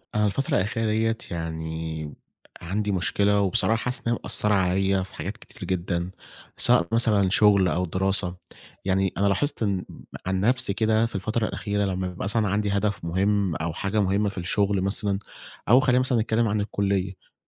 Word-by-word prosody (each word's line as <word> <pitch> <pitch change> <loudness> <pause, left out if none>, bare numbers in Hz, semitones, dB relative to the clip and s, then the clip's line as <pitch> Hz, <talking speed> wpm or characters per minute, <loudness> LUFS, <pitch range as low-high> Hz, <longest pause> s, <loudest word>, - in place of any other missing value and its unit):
أنا 105 0 +2
الفترة 135 +7 0
الأخيرة 110 +4 -1
دِيّة 110 +1 +1
يعني 80 -2 -5 0.5
عندي 100 +5 -2
مشكلة 100 +2 +1
وبصراحة 100 +3 +2
حاسس 125 +1 -3
إن - - +2
هي - - -1
مأثرة 105 0 +3
عليَّ 95 0 +1
في 95 - -12
حاجات - - -5
كتير - - -12
جدًا، 90 -1 -2 0.5
سواء 85 - +4
مثلًا 110 -4 +3
شغل 100 -1 +4
أو 90 +2 0
دراسة. 95 +1 0 0.5
يعني 95 0 +1
أنا 100 - +2
لاحظت 140 +6 0
إن 100 -3 -1 0.4
عن 95 0 -1
نفسي 125 0 +3
كده 110 +2 +2
في 115 - -6
الفترة 110 +4 -1
الأخيرة 100 -1 -2
لمّا 95 -1 -2
بيبقى 90 -1 -6
مثلًا 105 +2 +1
عندي 100 +1 0
هدف 100 -1 -1
مُهم 95 +1 0
أو 80 -1 -3
حاجة 100 +5 -1
مُهمة 100 +2 +1
في 100 - -11
الشغل 100 +2 0
مثلًا 100 0 0 0.5
أو 125 - +7
خلّينا 130 -1 +3
مثلًا 130 -3 +1
نتكلم 115 +1 +1
عن 105 0 0
الكُلّية. 100 -2 -2
100 Hz, 170 wpm, -25 LUFS, 95-105 Hz, 0.5 s, أو